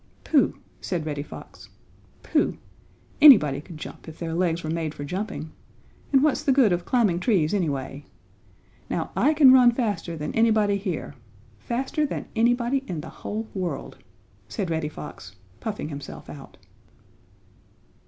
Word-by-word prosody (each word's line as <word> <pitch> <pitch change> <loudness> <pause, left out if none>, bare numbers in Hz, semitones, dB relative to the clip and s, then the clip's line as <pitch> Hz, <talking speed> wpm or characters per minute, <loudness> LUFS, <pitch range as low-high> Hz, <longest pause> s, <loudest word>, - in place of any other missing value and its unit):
"Pooh!" 295 -4 +2 0.2
said 175 -4 -3
Reddy 145 -2 -3
Fox, 145 - -11 0.5
"pooh! - - +1 0.6
Anybody 150 - +8
could 160 +1 -11
jump 155 - -10
if 160 0 -9
their 165 -1 -4
legs 170 -1 0
were 155 - -4
made 160 -2 -3
for 145 - -6
jumping. 180 0 -5 0.6
And 270 -1 +5
what's 300 -2 +2
the 295 -3 +2
good 255 -8 +4
of 175 0 -2
climbing 215 -9 +2
trees 185 -5 +1
anyway? 145 -6 -2 0.8
Now - - -2
I 305 - +3
can 275 -4 +8
run 250 -2 +7
faster 205 -9 -2
than 150 0 -4
anybody 215 -3 +3
here 190 -7 -4 0.5
faster 260 - -2
than 290 - -3
anybody 240 +3 +2
in 165 -4 -4
the - - -9
whole 220 +2 -5
world!" 185 -3 -4 0.5
said 195 -7 -3
Reddy 160 -2 -1
Fox, 100 -10 -10 0.2
puffing 210 -8 -4
himself 145 -2 -8
out. 140 -2 -12
185 Hz, 145 wpm, -25 LUFS, 155-235 Hz, 0.8 s, Anybody